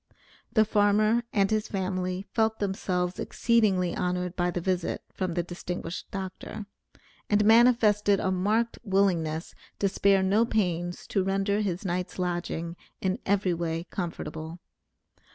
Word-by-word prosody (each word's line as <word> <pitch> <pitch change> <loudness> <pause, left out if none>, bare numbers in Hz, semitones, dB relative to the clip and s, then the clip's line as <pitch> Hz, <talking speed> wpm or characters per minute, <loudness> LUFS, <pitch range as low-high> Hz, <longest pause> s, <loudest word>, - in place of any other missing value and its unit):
The 220 -2 +4
farmer 215 +2 +3
and 195 -1 +2
his 215 -1 +1
family 185 -1 -2
felt 220 -1 +2
themselves 185 -3 -1
exceedingly 200 -7 +2
honored 180 0 -2
by 175 0 +1
the 175 - -2
visit 180 0 -1
from 185 -3 -2
the 175 - +1
distinguished 175 0 -6
doctor, 195 +2 -6 0.6
and 210 0 +3
manifested 220 -3 +5
a 190 - 0
marked 215 +5 0
willingness 180 -6 +1 0.2
to 200 - +1
spare 195 0 +3
no 200 +4 +3
pains 175 -6 -1
to 195 - 0
render 195 +2 +1
his 190 -1 -2
night's 180 0 -2
lodging 175 -2 -2 0.2
in 190 0 -1
every 195 -2 +2
way 165 -1 -2
comfortable. 165 -2 -5
190 Hz, 135 wpm, -27 LUFS, 180-205 Hz, 0.6 s, manifested